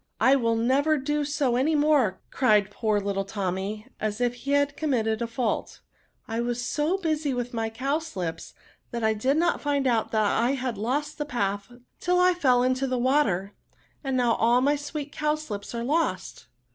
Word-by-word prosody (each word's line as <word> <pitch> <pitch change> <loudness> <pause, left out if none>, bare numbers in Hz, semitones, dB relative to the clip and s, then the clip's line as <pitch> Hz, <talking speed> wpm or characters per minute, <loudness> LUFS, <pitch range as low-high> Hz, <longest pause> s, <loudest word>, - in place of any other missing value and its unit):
I 265 - +5
will 230 -4 +1
never 275 +7 +2
do 295 +2 -1
so 285 -4 0
any 290 +6 +2
more," 290 -10 +3
cried 210 -6 +3
poor 215 0 0
little 195 -1 -1
Tommy, 195 +1 -3
as 215 0 -2
if 245 -1 +1
he 270 +3 -4
had 285 0 +2
committed 230 -7 0
a 235 - -2
&ult; 240 -4 -2 0.2
" - - -42
I 225 +1 -2
was 240 0 -2
so 310 +8 0
busy 310 -6 -1
with 245 0 -3
my 225 -1 -1
cowslips, 240 - -3 0.3
that 235 -1 -4
I 220 0 +3
did 260 +7 +1
not 345 +2 +1
find 285 -2 0
out 235 -4 +1
I 220 +4 +2
had 255 -3 -2
lost 290 +8 -2
the 295 - -1
path 205 -5 -2 0.3
till 360 0 +2
I 365 0 +5
fell 255 -8 +3
into 255 +1 +1
the 255 -1 -1
water; 240 -7 +1 0.5
and 265 -2 -1
now 240 -2 +3
all 235 +2 +3
my 285 +3 +3
sweet 290 0 -5
cowslips 300 -10 -3
are 235 - -2
lost 315 +6 -1
250 Hz, 185 wpm, -26 LUFS, 220-290 Hz, 0.5 s, I